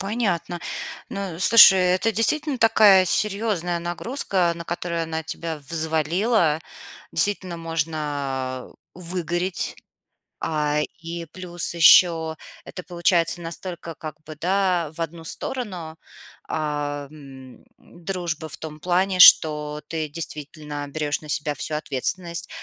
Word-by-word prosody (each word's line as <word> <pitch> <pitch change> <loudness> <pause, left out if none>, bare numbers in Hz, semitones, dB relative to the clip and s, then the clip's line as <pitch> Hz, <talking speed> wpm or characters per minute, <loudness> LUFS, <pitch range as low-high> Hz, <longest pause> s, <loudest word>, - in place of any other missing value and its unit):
Понятно. 195 -5 -2 0.5
Но, 195 -4 -5
слушай, 195 -1 +8
это 185 +4 +2
действительно 280 +6 +1
такая 210 -5 +6
серьёзная 195 -3 +1
нагрузка, 175 0 -1
на 170 - -7
которую 170 0 -3
она 160 0 -4
тебя 160 0 -5
взвалила. 160 - 0 0.5
Действительно 185 -1 0
можно 145 -5 -3 0.2
выгореть, 175 +1 -3 0.6
а, 150 -1 -1 0.2
и 165 0 -6
плюс 175 -2 -3
ещё 165 -1 +5 0.3
это 180 - -9
получается 175 -1 +1
настолько 170 0 -6
как 155 -2 -7
бы, 155 0 -10
да, 180 -3 +1
в 170 - -9
одну 165 0 -5
сторону, 180 -7 -5 0.5
а, 145 -2 -3
м, 135 -4 -13
дружба 170 -2 -5
в - - -9
том 155 -1 -8
плане, 185 +3 0
что 150 -3 +6
ты 160 -2 -3
действительно 150 -1 -6
берёшь 150 0 -2
на 155 - -13
себя 150 0 -1
всю 150 +2 -3
ответственность 170 +4 -1
165 Hz, 115 wpm, -23 LUFS, 155-185 Hz, 0.6 s, слушай